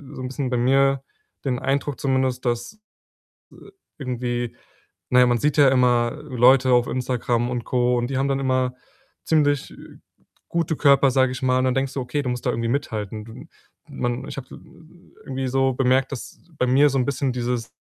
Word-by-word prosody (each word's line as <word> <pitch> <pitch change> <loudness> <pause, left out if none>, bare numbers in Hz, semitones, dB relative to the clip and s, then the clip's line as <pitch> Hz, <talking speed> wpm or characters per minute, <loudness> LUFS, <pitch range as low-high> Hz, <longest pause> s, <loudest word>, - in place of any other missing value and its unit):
so - - -7
'n - - -3
bisschen 135 0 -3
bei 125 - 0
mir 135 +2 +2 0.4
den 125 -2 -1
Eindruck 140 0 -2
zumindest, 130 -2 0
dass, 120 - -2
i 215 - -28 1.3
irgendwie 120 -1 -3 0.5
na 125 - +5
ja, 125 - +7
man 120 -1 +2
sieht 150 0 0
ja 145 -2 +7
immer 125 -2 +2
Leute 130 +1 +4
auf 120 -1 +4
Instagram 120 -1 -1
und 120 -2 -3
Co. 125 -1 +1
und 120 0 -1
die 135 -1 -3
haben 135 +1 0
dann 135 - 0
immer 130 -1 0 0.5
ziemlich 145 -3 +1 0.8
gute 165 -1 -1
Körper, 140 -2 +4
sage 130 0 +2
ich 130 - -7
mal 130 -1 +2
und 130 - +1
dann 130 - +2
denkst 135 0 -1
du: - - -3
„Okay, 145 +4 -2
du 125 - -3
musst 125 -1 -4
da - - +2
irgendwie 115 0 -2
mithalten.“ 110 -5 -3
Du 110 - -11 0.4
man 120 +2 -3
ich - - -8
habe 130 - -7
i - - -9 0.7
irgendwie 135 0 -3
so 135 0 +1
bemerkt, 130 +1 +1
dass 125 - -8 0.2
bei 125 - +1
mir 135 +4 +5
so 135 - -1
'n - - +2
bisschen 135 -1 -1
dieses, 120 -1 -3
130 Hz, 195 wpm, -23 LUFS, 125-135 Hz, 1.3 s, ja